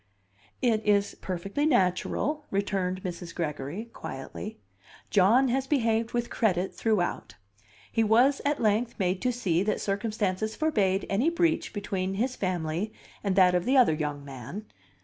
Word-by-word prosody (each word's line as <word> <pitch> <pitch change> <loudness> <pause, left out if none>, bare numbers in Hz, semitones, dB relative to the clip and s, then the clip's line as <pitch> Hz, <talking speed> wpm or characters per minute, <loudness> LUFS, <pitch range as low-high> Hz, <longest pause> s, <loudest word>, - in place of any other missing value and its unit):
"It 225 -3 +2
is 205 -1 +2
perfectly 195 - -2
natural," 275 - +1
returned 190 -2 -1
Mrs. 175 -1 -6
Gregory, 155 +4 -3
quietly. 200 +10 -7 0.5
"John 225 +7 +5
has 265 +2 0
behaved 230 -5 +1
with 240 0 -2
credit 190 -5 +1
throughout. 185 - -1 0.6
He 225 - +2
was 245 +6 +4
at 285 +1 0
length 220 +2 +1
made 185 -1 0
to 250 - +1
see 190 -9 0
that 210 +2 0
circumstances 210 0 -1
forbade 205 -11 +1
any 225 +11 +2
breach 335 -2 +1
between 195 -2 -3
his 250 +5 -1
family 180 +1 -2 0.3
and 195 -2 0
that 185 -2 +6
of 180 -1 +2
the 260 +6 +3
other 245 -11 +6
young 145 -2 -3
man. 140 - -8
205 Hz, 145 wpm, -28 LUFS, 185-235 Hz, 0.6 s, that